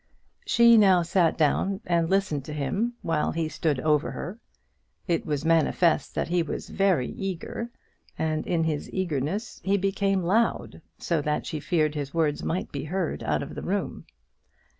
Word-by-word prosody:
She 235 -1 +6
now 190 -4 +5
sat 170 0 +2
down 190 +5 +1
and 170 -1 +1
listened 190 -8 +1
to 150 - -6
him, 195 - -1
while 160 -2 0
he 165 -1 -1
stood 155 -3 -1
over 150 0 +2
her. 205 +6 -6 0.7
It 170 -3 0
was 150 0 -2
manifest 165 -1 +2
that - - -1
he 175 0 +2
was 160 - -5
very 190 -10 +2
eager, 195 +5 -5 0.5
and 155 -1 -1
in 170 -2 +1
his 155 -2 -2
eagerness 185 - -2
he 195 +1 +2
became 195 0 0
loud, 220 +7 0 0.2
so 165 -3 0
that 150 +1 -1
she 155 - -4
feared 155 -1 +1
his 145 0 -5
words 155 -3 +1
might 175 +3 -2
be 140 0 -4
heard 180 +1 -2
out - - 0
of - - -8
the - - -6
room. - - -3
165 Hz, 165 wpm, -26 LUFS, 155-195 Hz, 0.7 s, She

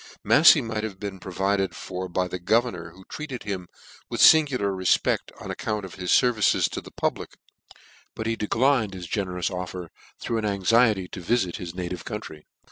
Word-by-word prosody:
tvlaf 160 - +8
fey 150 - +3
might 110 -3 -4
have 100 -4 -5
been 100 -2 -6
provided 95 +1 -1
for 95 0 -6
by 90 +1 -1
the 90 0 -5
governor, 95 -3 0
who 95 +3 -17
treated 145 -5 -7
him 95 -4 -4 0.4
with - - -4
fingular 130 -11 +5
refpecl:; 95 -1 +2 0.2
on - - -6
account 105 -2 -3
of 95 - -10
his 90 -1 -6
fervices 120 -5 +3
to - - -6
the - - -12
public; - - -3 0.8
but 110 - -5
he 115 0 0
declined 115 -1 +1
his 90 -1 -7
generous 90 -1 -2
offers, 90 -1 -6 0.3
through 115 - -2
an 110 - -3
anxiety 105 0 +2
to 90 - -8
vifit 95 -1 0
his 85 -1 -7
native 90 -1 -5
country. 105 -9 -8
100 Hz, 180 wpm, -25 LUFS, 90-115 Hz, 0.8 s, tvlaf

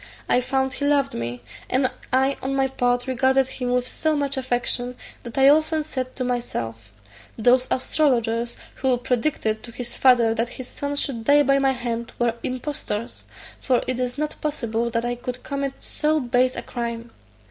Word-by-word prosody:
I 250 - +4
found 265 +1 0
he 285 - -2
loved 285 -2 +2
me; 120 +1 -4 0.3
and 255 +1 +3 0.2
I 265 +2 +3
on 270 +1 -2
my 270 0 +3
part 245 -2 0
regarded 265 +1 +3
him 250 -1 -4
with 250 0 +1
so 315 +3 0
much 285 -1 0
affection, 245 -1 -1 0.3
that 235 +1 -9
I 270 0 +6
often 310 +1 +3
said 260 -4 -4
to 255 - -2
myself, 115 - -3 0.5
"Those 250 +3 +4
astrologers 240 -4 +1 0.2
who 260 -2 +2
predicted 240 -3 0
to 235 - -9
his 240 0 -6
father 240 -3 +5
that 230 +1 -1
his 255 - -6
son 285 +2 -4
should 245 -5 -2
die 290 +3 +6
by 275 0 +4
my 270 -1 +3
hand 235 -2 -4
were 240 -1 +2
impostors; 255 -4 -4 0.3
for 255 -3 +1
it 255 -1 -2
is 250 +1 -2
not 305 0 -3
possible 235 -6 -1
that 230 0 -1
I 240 - 0
could 250 +1 -6
commit 275 -1 -2
so 310 +1 +1
base 250 0 +2
a - - -4
crime." 235 -1 -5
250 Hz, 180 wpm, -23 LUFS, 235-270 Hz, 0.5 s, I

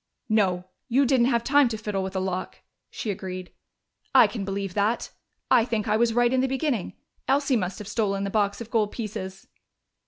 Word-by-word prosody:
"No, 190 -5 +2 0.2
you 270 +3 +3
didn't 250 -2 +3
have 235 -3 +1
time 285 0 +5
to 225 -2 -3
fiddle 210 -2 -2
with 190 0 -5
a - - +1
lock," 185 -1 -4 0.3
she 215 - -4
agreed. 185 -1 -6 0.6
"I - - +9
can 215 -5 -3
believe 195 -1 -3
that.... 210 +4 0 0.4
I 245 -3 +6
think 225 -3 -2
I 210 - +2
was 230 +1 +3
right 240 +1 +3
in 260 - +3
the 265 - +1
beginning: 265 - -1 0.3
Elsie 275 0 +2
must 190 -4 -1
have 210 - -8
stolen 200 -3 0
the 200 - -2
box 205 0 0
of 235 - -8
gold 215 -3 +1
pieces." 195 -4 -6
215 Hz, 195 wpm, -26 LUFS, 195-240 Hz, 0.6 s, I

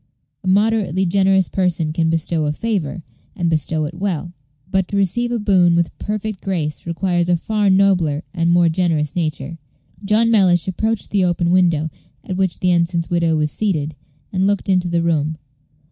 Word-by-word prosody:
A - - -6
moderately 195 -2 +2
generous 190 0 +2
person 170 -4 -1
can 165 0 +1
bestow 165 -1 0
a - - +1
favor, 180 -3 -3 0.3
and 170 -2 -1
bestow 155 0 0
it 150 - -6
well; 175 -2 -3 0.4
but 190 -1 +1
to 200 - -2
receive 240 +5 0
a 240 - 0
boon 185 -5 +3
with 170 -1 0
perfect 210 -2 -4
grace 165 -5 -3
requires 175 0 0
a 175 - +3
far 210 +3 0
nobler 185 -6 +2
and 170 -2 0
more 175 0 +4
generous 160 -4 0
nature. 160 -1 -3 0.4
John 220 +3 +2
Mellish 185 -6 +3
approached 220 +4 -2
the 200 -2 +2
open 175 -1 +1
window 170 -4 +2 0.3
at 185 - -5
which 190 -1 -1
the 180 - +2
ensign's 170 -1 0
widow 170 -2 +2
was 150 -1 0
seated, 155 -8 -2 0.4
and 190 +1 +1
looked 200 -1 -1
into 180 -2 +2
the 170 -1 0
room. 155 -2 0
175 Hz, 175 wpm, -19 LUFS, 165-195 Hz, 0.4 s, more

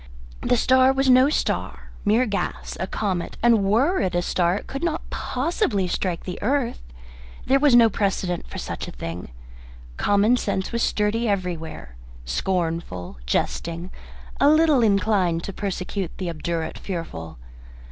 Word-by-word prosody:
The 245 - +2
star 260 +2 +5
was 270 -1 +3
no 255 +2 +6
star 305 - -2
mere 220 +5 +4
gas 205 -3 -3
a 185 - -2
comet; 190 -4 -2
and 230 -4 +5
were 250 - +2
it 185 -1 -1
a 175 - +1
star 175 0 +1
it - - -7
could 275 +4 -6
not 330 -1 -2
possibly 255 - -1
strike 175 -1 -2
the 180 - -6
earth. 250 +1 0 0.6
There 270 +1 +4
was 285 -3 +5
no 235 -1 +8
precedent 195 -4 -1
for - - -8
such - - -5
a - - -7
thing. 85 +8 -6 0.7
Common 205 +4 +3
sense 195 -4 -2
was 235 - -1
sturdy 220 +2 +1
everywhere, 170 - -4 0.3
scornful, 160 - -2
jesting, 170 - -2 0.5
a 285 - +6
little 310 -3 +5
inclined 200 -5 +2
to 195 - -5
persecute 190 -1 -3
the 180 -3 -3
obdurate 165 0 -3
fearful. 80 - -6
200 Hz, 145 wpm, -23 LUFS, 175-245 Hz, 0.7 s, no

